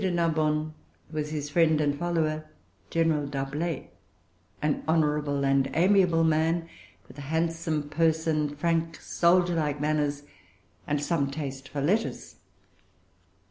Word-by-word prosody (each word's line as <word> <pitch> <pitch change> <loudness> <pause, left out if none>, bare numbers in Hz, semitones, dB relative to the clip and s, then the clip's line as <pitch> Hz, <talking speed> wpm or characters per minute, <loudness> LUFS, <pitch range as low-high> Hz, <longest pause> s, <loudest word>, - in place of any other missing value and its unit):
de 190 - +2
Narbonne 155 -3 0 0.4
was 150 -1 -3
his 150 -1 -4
friend 160 -1 +3
and 145 -1 +1
follower 155 -3 -1 0.4
General 160 -3 +1
D'Arblay, 140 +3 -3 0.7
an 150 -1 0
honorable 150 -3 +1
and 135 -1 +2
amiable 180 -1 +4
man, 160 +1 +1 0.4
with 130 +3 -13
a 140 0 -8
handsome 160 -2 -1
person, 155 -1 +1
frank 165 +1 0
soldier 175 +1 +2
like 150 -3 -1
manners, 145 -1 0 0.6
and 145 -1 0
some 145 -3 0
taste 135 -2 -6
for 145 - -3
letters. 205 +9 -1
155 Hz, 120 wpm, -27 LUFS, 145-165 Hz, 0.7 s, amiable